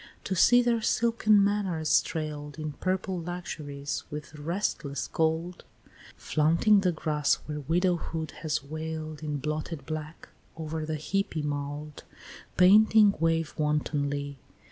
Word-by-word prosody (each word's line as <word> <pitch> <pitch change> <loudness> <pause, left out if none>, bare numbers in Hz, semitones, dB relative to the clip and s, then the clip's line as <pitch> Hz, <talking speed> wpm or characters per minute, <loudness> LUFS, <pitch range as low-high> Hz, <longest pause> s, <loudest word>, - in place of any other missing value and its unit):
to 190 - -2
see 245 +7 +6
their 235 -1 +1
silken 220 -2 +3
manors 190 -7 +2
trail'd 150 -2 -5
In 155 -1 -4
purple 185 +3 -2
luxuries 150 -5 -5
with 150 +1 -7
restless 150 -3 -3
gold, 165 +2 -1 0.5
Flaunting 165 +7 +3
the 185 -2 +2
grass 150 -3 +1
where 150 -1 -4
widowhood 165 0 -1
has 150 -4 -1
wail'd 155 +1 -5
In 150 -1 -3
blotted 150 +1 -4
black, 155 +1 -6 0.3
over 160 -1 -4
the 155 - -2
heapy 160 -1 -2
mould 145 +1 -4 0.5
Panting 210 +2 +6
wave 165 -1 +1
wantonly! 145 -2 -1
160 Hz, 120 wpm, -28 LUFS, 150-180 Hz, 0.5 s, see